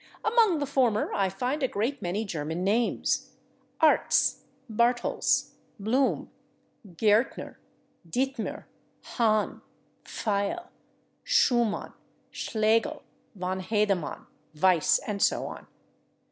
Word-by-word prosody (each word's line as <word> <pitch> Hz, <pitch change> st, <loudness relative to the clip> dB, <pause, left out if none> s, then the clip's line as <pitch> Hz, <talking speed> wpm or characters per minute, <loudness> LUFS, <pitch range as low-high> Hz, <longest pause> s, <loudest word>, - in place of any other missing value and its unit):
Among 435 Hz, -5 st, +4 dB
the 290 Hz, -, -1 dB
former 250 Hz, -6 st, +1 dB
I 195 Hz, -1 st, +1 dB
find 250 Hz, +10 st, -2 dB
a 260 Hz, -, +2 dB
great 240 Hz, +5 st, -2 dB
many 195 Hz, +5 st, -2 dB
German 160 Hz, -1 st, -3 dB
names: 225 Hz, +5 st, 0 dB, 0.5 s
/Artz/, 310 Hz, -, +4 dB, 0.3 s
/Bartels/, 240 Hz, +2 st, +1 dB, 0.3 s
/Blum/, 250 Hz, +7 st, +1 dB, 0.7 s
/Gaertner/, 215 Hz, +6 st, +1 dB, 0.5 s
/Dittmer/, 260 Hz, +3 st, -2 dB, 0.4 s
/Hahn/, 215 Hz, -3 st, 0 dB, 0.4 s
/Pfeil/, 210 Hz, -, -2 dB, 0.5 s
/Schuman/, 240 Hz, -, +2 dB, 0.4 s
/Schlegel/, 220 Hz, 0 st, 0 dB, 0.3 s
/von 185 Hz, +1 st, -3 dB
Hedemann/, 200 Hz, -4 st, -1 dB, 0.3 s
/Weiss/ 180 Hz, -1 st, +4 dB
and 205 Hz, -2 st, -3 dB
so -, -, +2 dB
on. -, -, -8 dB
220 Hz, 90 wpm, -27 LUFS, 195-255 Hz, 0.7 s, Among